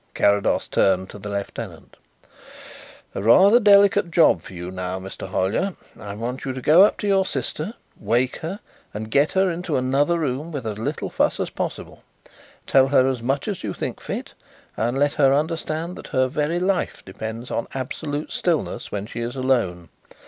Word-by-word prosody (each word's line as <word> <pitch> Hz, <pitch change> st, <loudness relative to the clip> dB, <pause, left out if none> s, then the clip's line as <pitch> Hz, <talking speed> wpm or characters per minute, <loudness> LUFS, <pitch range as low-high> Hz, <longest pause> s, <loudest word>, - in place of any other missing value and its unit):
Carrados 100 Hz, 0 st, +2 dB
turned 95 Hz, -1 st, +1 dB
to 105 Hz, -, -10 dB
the 105 Hz, +1 st, -7 dB
lieutenant. 100 Hz, -1 st, -6 dB, 1.2 s
"A -, -, -3 dB
rather 190 Hz, -, +6 dB
delicate 200 Hz, -3 st, +5 dB
job 165 Hz, -, +4 dB
for -, -, -12 dB
you 90 Hz, 0 st, -6 dB
now, 90 Hz, 0 st, -4 dB
Mr. 95 Hz, 0 st, -8 dB
Hollyer. 100 Hz, -, 0 dB, 0.2 s
I 100 Hz, 0 st, -7 dB
want 120 Hz, +4 st, -4 dB
you 130 Hz, -, -3 dB
to 130 Hz, -, -5 dB
go 165 Hz, +6 st, +7 dB
up 210 Hz, -, +3 dB
to 205 Hz, -, -1 dB
your 195 Hz, -1 st, +4 dB
sister, 155 Hz, -, -4 dB, 0.2 s
wake 125 Hz, +2 st, 0 dB
her, 175 Hz, +6 st, -6 dB, 0.3 s
and 110 Hz, +1 st, -5 dB
get 140 Hz, +4 st, +3 dB
her 190 Hz, -1 st, +3 dB
into 165 Hz, -3 st, -2 dB
another 140 Hz, +6 st, +2 dB
room 150 Hz, +1 st, -2 dB
with 140 Hz, -6 st, -5 dB
as 105 Hz, -1 st, -4 dB
little 115 Hz, -, -3 dB
fuss -, -, +1 dB
as -, -, -2 dB
possible. -, -, -5 dB, 0.6 s
Tell 135 Hz, -1 st, +4 dB
her 130 Hz, -1 st, +4 dB
as 130 Hz, -3 st, -1 dB
much 135 Hz, +4 st, -1 dB
as 200 Hz, -4 st, -4 dB
you 100 Hz, -3 st, -3 dB
think -, -, -5 dB
fit -, -, -5 dB, 0.4 s
and 120 Hz, +3 st, -1 dB
let 145 Hz, +1 st, +2 dB
her 135 Hz, -2 st, +4 dB
understand 160 Hz, +2 st, -2 dB
that -, -, -9 dB
her 130 Hz, 0 st, +1 dB
very 150 Hz, +5 st, -1 dB
life 185 Hz, 0 st, -1 dB
depends 110 Hz, +5 st, -6 dB
on 115 Hz, -, -2 dB
absolute 145 Hz, +3 st, -4 dB
stillness 170 Hz, -4 st, -1 dB
when 100 Hz, -1 st, -3 dB
she 115 Hz, +2 st, -7 dB
is 120 Hz, +2 st, -4 dB
alone. 115 Hz, -11 st, 0 dB
130 Hz, 180 wpm, -23 LUFS, 110-165 Hz, 1.2 s, go